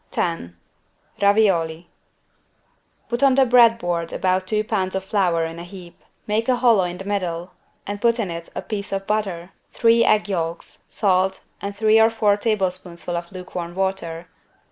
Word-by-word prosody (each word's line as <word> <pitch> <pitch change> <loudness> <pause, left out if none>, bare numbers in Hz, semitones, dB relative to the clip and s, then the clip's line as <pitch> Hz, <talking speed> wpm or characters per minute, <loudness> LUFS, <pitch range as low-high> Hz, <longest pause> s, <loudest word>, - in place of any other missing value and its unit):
10 125 - -3 0.6
RAVIOLI 185 -6 +2 1.2
Put 240 +1 -2
on 275 -2 +5
the 270 -1 +5
bread 235 -2 +6
board 170 -4 -2
about 185 0 0
two 215 +1 +1
pounds 195 -4 -2
of 190 - -2
flour 180 -5 +1
in 165 +1 -7
a - - -7
heap; 175 -1 -12 0.2
make 220 +3 -1
a 255 - +4
hollow 235 -6 +4
in 175 0 -5
the 195 - -8
middle 180 -3 -3 0.3
and 205 0 -5
put 235 0 +3
in 205 -7 -2
it 170 0 -7
a - - -4
piece 205 -3 -5
of 195 0 -3
butter, 195 -4 -2 0.2
three 230 0 +4
egg 215 -2 +3
yolks, 170 -3 -4
salt 190 -2 +1 0.2
and 200 0 -5
three 220 +1 +5
or 225 - +6
four 220 -3 +2
tablespoonfuls 185 -5 -2
of - - -25
lukewarm 180 -2 -7
water. 190 -3 -2
195 Hz, 165 wpm, -22 LUFS, 175-215 Hz, 1.2 s, bread